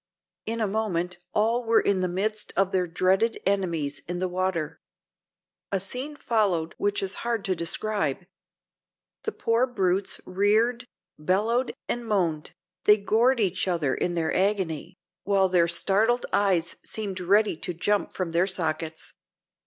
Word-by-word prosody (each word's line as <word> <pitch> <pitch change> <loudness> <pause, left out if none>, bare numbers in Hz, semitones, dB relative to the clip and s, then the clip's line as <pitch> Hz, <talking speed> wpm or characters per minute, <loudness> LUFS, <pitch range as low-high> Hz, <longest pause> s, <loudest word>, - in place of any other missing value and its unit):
In 230 +1 -1
a 215 - +2
moment 180 -4 -2
all 230 +3 +1
were 230 0 +4
in 200 -2 +1
the 185 - +1
midst 210 +4 -2
of 195 0 +3
their 180 -1 +1
dreaded 190 +6 +1
enemies 170 -7 0
in 175 +1 -3
the 185 +1 -1
water. 180 -4 -2 0.9
A 195 - +1
scene 255 +10 -3
followed 200 - 0
which 205 -1 0
is 195 - -1
hard 235 -3 -1
to 185 - +1
describe. 170 -1 -1 1.0
The 440 - 0
poor 235 - +1
brutes 195 -5 0
reared, 220 +6 +1 0.3
bellowed 215 +10 +1
and 240 - -2
moaned; 175 -8 0 0.3
they 210 - +7
gored 230 +5 +2
each 190 -3 0
other 165 -7 +1
in 175 - -1
their 165 -2 0
agony, 190 -5 -1 0.3
while 195 -1 +3
their 175 -2 +3
startled 210 +8 +2
eyes 185 -5 +2
seemed 200 -4 -5
ready 200 +2 +3
to 180 - -5
jump 200 +4 0
from 180 -3 -3
their 170 +3 +2
sockets. 160 -3 -3
195 Hz, 145 wpm, -26 LUFS, 175-215 Hz, 1.0 s, they